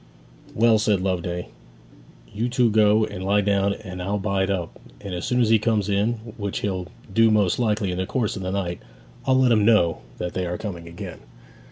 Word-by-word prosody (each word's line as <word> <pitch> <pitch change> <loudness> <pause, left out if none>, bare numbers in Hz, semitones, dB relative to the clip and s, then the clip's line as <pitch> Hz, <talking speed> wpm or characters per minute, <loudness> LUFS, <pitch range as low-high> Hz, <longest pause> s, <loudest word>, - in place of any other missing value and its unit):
'Well,' 115 0 +4
said 105 -2 +2
Loveday, 90 -2 -2 0.8
'you 115 +4 -1
two 120 -2 +2
go 105 0 +4
and 95 - -7
lie 100 +2 +3
down 100 0 +1
now - - -8
and 90 -1 -7
I'll 100 +3 -1
bide 100 -1 0
up; 90 -4 -3 0.2
and 100 -3 -7
as 90 - -3
soon 125 - +1
as 115 - +3
he 110 -1 +5
comes 105 -2 0
in, 100 +4 +2 0.2
which 100 -2 -3
he'll 95 -3 -2 0.3
do 115 +2 +5
most 105 -3 +2
likely 105 -4 0
in 90 - -3
the 95 - -2
course 115 -5 -1
of 95 - -5
the 90 - -3
night, 95 -3 -2 0.5
I'll 130 0 +4
let 130 -2 +4
him 110 -2 +4
know 105 -7 +3 0.2
that 90 - -4
they 90 -1 -2
are 90 0 -3
coming 85 -6 -6
again.' 85 - -8
100 Hz, 210 wpm, -23 LUFS, 95-110 Hz, 0.8 s, he